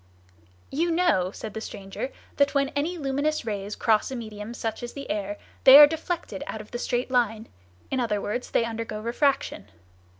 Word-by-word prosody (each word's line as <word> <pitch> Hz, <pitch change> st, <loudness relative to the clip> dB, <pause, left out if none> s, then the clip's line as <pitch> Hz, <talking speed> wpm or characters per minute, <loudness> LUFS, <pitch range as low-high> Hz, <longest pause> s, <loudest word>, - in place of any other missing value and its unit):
"You 330 Hz, +5 st, 0 dB
know," 330 Hz, -, +2 dB
said 215 Hz, +2 st, -8 dB
the 220 Hz, -, -5 dB
stranger, 195 Hz, +5 st, -6 dB, 0.3 s
"that 285 Hz, 0 st, +3 dB
when 275 Hz, -1 st, +2 dB
any 315 Hz, +5 st, -2 dB
luminous 285 Hz, 0 st, -1 dB
rays 205 Hz, -1 st, -3 dB
cross 220 Hz, -2 st, +2 dB
a 265 Hz, -, -5 dB
medium 215 Hz, -1 st, -7 dB
such 225 Hz, -2 st, -3 dB
as 240 Hz, 0 st, -6 dB
the 280 Hz, -1 st, -7 dB
air, 205 Hz, 0 st, -3 dB, 0.3 s
they 265 Hz, +1 st, +11 dB
are 295 Hz, -, +12 dB
deflected 320 Hz, -, -4 dB
out 220 Hz, -, -5 dB
of 215 Hz, -, -11 dB
the 240 Hz, -, -4 dB
straight 245 Hz, +1 st, -1 dB
line; 225 Hz, -3 st, +1 dB, 0.4 s
in 265 Hz, -, 0 dB
other 225 Hz, -4 st, 0 dB
words, 245 Hz, +5 st, -3 dB
they 230 Hz, -, +2 dB
undergo 225 Hz, -2 st, -4 dB
refraction. 235 Hz, -, 0 dB
240 Hz, 180 wpm, -26 LUFS, 215-280 Hz, 0.4 s, are